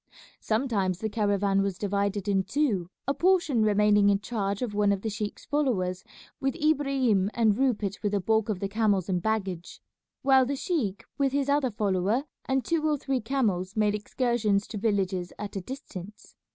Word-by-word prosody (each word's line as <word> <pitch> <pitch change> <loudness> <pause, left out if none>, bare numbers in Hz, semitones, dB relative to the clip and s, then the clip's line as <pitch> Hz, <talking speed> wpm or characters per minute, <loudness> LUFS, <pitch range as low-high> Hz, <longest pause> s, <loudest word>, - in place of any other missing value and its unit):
Sometimes 215 -6 0
the 220 +3 -3
caravan 200 -2 +1
was 195 -2 -1
divided 200 0 -1
in 195 -1 +2
two, 205 - 0 0.2
a 275 - +2
portion 340 -5 +2
remaining 210 -1 +4
in 200 -1 +3
charge 200 -1 -2
of 230 -4 -3
one 205 0 +2
of 195 -1 -1
the 220 - -2
sheik's 210 0 -5
followers 205 -11 0 0.4
with 270 0 -1
Ibrahim 275 - +2
and 220 -3 +3
Rupert 215 -6 0
with 205 -1 -1
the 205 - +2
bulk 220 +3 +1
of 205 -4 -1
the 195 - 0
camels 200 -3 +1
and 180 -2 0
baggage, 195 -5 -3 0.4
while 265 -1 +5
the 280 - -1
sheik 260 - -2 0.2
with 275 -1 +2
his 280 0 0
other 285 -2 +2
follower 205 +3 0 0.2
and 265 -2 0
two 330 -2 0
or 300 - +1
three 270 -2 -2
camels 215 -7 -1
made 210 -1 +3
excursions 210 -2 0
to 215 - -5
villages 195 -4 -1
at 210 -1 -6
a 195 - -2
distance. 210 - -9
210 Hz, 180 wpm, -27 LUFS, 200-260 Hz, 0.4 s, while